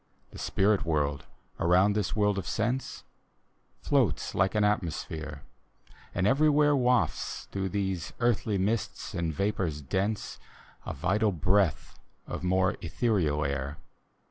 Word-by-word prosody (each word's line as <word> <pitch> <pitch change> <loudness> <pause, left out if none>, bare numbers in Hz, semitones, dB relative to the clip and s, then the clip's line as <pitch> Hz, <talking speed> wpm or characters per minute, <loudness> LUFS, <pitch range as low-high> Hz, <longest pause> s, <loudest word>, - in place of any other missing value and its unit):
The - - -10
spirit 100 +1 +2
world 75 -3 -1 0.3
around 90 +4 +4
this 105 -2 -1
world 105 -2 +2
of - - -6
sense 120 +4 -2 0.8
Floats - - +1
like 95 +3 +1
an 105 - +3
atmosphere, 80 -7 -2 0.7
and 90 - +1
everywhere 145 +4 +4
Wafts 125 - 0
through 95 -1 -2
these 95 -4 -2
earthly 115 -3 +1
mists 105 +3 -2
and 85 -1 -1
vapors 90 -3 -1
dense 95 +9 -2 0.5
A - - -3
vital 100 +7 +1
breath 90 -1 +1 0.3
of - - -5
more 95 +1 +2
ethereal 80 -11 0
air. 70 +2 -3
95 Hz, 120 wpm, -29 LUFS, 80-105 Hz, 0.8 s, around